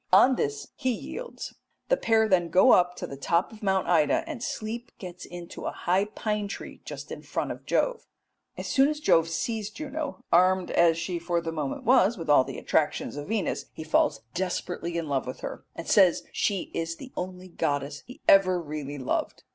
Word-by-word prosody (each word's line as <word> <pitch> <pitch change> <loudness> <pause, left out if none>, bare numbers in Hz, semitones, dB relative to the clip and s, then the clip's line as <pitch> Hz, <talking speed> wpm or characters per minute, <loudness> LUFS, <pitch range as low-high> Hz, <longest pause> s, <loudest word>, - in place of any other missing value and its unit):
On 245 +8 +7
this 145 -9 -2
he 260 - -1
yields; 475 - -6 0.4
the - - +5
pair 225 - +3
then 175 -4 +2
go 180 +3 +6
up 180 0 +4
to - - -5
the 140 - -7
top 170 +6 +1
of 220 - -13
Mount 190 -2 +1
Ida, 155 -4 +3
and 235 - -6
Sleep 235 +1 -4
gets 180 -2 -8
into 175 0 -7
a - - -1
high 185 +3 +1
pine 210 -1 -2
tree - - -8
just - - -8
in - - -6
front - - -3
of - - -9
Jove. - - 0 0.5
As - - -5
soon 270 +1 +4
as 300 0 -3
Jove 165 - +4
sees 215 +5 -2
Juno, 300 +4 -5
armed 185 +1 +4
as 170 -1 +4
she 170 +1 -2
for 170 0 0
the 165 -1 -4
moment 155 - -3
was 240 -3 +4
with 165 -4 -1
all 145 - +7
the - - -7
attractions - - 0
of 145 0 -6
Venus, 215 -4 -1
he 160 - -7
falls 155 -7 +2
desperately 180 -1 -2
in 165 -2 -2
love 135 -3 -1
with 130 - -6
her, - - -6
and 165 - -7
says 190 -5 +5
she 200 -3 -1
is 165 0 -2
the 260 +8 -11
only 185 0 -5
goddess 145 -3 -2
he 260 +5 -12
ever 185 -2 +6
really 150 -3 -5
loved. 130 - -2
180 Hz, 200 wpm, -27 LUFS, 165-220 Hz, 0.5 s, On